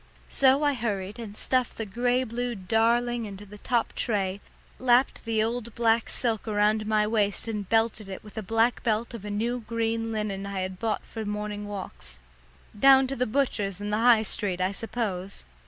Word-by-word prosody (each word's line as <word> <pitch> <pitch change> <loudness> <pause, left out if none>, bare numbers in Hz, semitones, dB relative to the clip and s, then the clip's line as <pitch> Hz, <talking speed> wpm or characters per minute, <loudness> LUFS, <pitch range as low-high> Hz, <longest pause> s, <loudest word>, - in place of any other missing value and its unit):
So 275 +2 +4
I 290 -1 +3
hurried 210 -4 -3
and 215 -2 -7
stuffed 255 -2 0
the 225 - -3
grey 245 +5 +1
blue 245 0 -3
darling 230 +4 +1
in 200 - -7
the 205 +1 -12
top 235 +1 0
tray, 200 -3 -1 0.4
lapped 250 +1 +3
the 220 -1 +1
old 235 0 -3
black 230 -1 +2
silk 225 -3 -1
around 215 0 +2
my 215 -1 +3
waist 210 -1 0
and 210 -4 -4
belted 225 -2 +1
it - - -4
in - - -7
with 210 - -13
a 220 - -3
black 225 +4 +1
belt 225 0 0
off 215 -3 -7
a - - -4
new 230 +4 -1
green 225 0 -2
linen 205 -3 -3
I 195 -1 -3
had 185 0 -4
bought 225 -2 -1
for 225 - -6
morning 210 0 -4
walks 190 - -7 0.6
down 270 +1 +7
to 275 - -2
the 250 0 0
butcher's 215 -6 0
in 205 0 -4
the 210 - +2
High 230 -2 +6
Street, 195 -3 -2
I 185 +1 +1
suppose. 200 -3 -4
220 Hz, 190 wpm, -27 LUFS, 205-235 Hz, 0.6 s, down